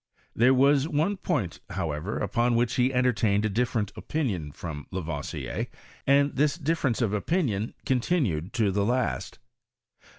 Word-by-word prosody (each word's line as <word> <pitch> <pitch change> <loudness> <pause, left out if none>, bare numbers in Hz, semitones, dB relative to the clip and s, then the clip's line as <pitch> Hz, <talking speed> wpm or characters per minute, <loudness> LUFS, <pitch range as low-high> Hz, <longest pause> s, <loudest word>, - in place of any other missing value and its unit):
There 125 +3 +5
was 140 +2 +4
one 165 +6 0
point, 140 - -2
however, 80 +5 -3
upon 120 +4 +1
which 120 0 +2
he 125 0 +3
enlevtained 115 -5 +2
a - - +1
dif 120 +4 0
lereot 105 -4 -1
opiniuD 95 - -3
from 75 -4 -6
Lavoisier, 80 -6 -4 0.4
and 140 +1 +4
this 150 +3 +2
difference 145 -7 0
of 105 -3 0
opinion 110 - 0
continued 120 - 0
to 110 -4 +2
the 100 +1 +1
last. 125 +3 -1
120 Hz, 140 wpm, -27 LUFS, 95-140 Hz, 0.4 s, There